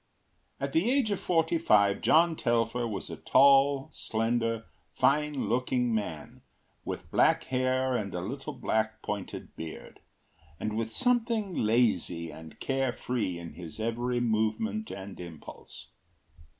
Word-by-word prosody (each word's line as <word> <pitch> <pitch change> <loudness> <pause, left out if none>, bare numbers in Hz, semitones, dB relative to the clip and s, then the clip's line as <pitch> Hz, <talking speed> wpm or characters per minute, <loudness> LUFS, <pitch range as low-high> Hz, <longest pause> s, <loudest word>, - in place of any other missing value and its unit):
At 140 0 -3
the 175 +9 +3
age 260 -5 +2
of 200 - -1
forty 165 -1 +1
five 100 -9 +4
John 165 +1 +4
Telfer 120 -2 0
was 100 -4 -5
a - - -6
tall, 140 0 +5
slender, 115 0 -1 0.3
fine 150 -4 +2
looking 125 +1 +1
man, 80 -9 -4 0.4
with - - -6
black - - +4
hair 130 0 0
and 100 -5 -2
a - - -1
little 135 +9 -5
black 110 -4 -1
pointed 105 -2 -5
beard, 80 -1 -8 0.6
and 110 0 -2
with 115 0 -2
something 230 - +1
lazy 105 - +1
and 80 +1 -12
care 135 -1 0
free 105 -10 -2
in 85 -2 -8
his 85 +4 -9
every 120 +2 -1
movement 120 - 0
and 95 0 -8
impulse. 85 -4 -10
120 Hz, 135 wpm, -29 LUFS, 105-140 Hz, 0.6 s, tall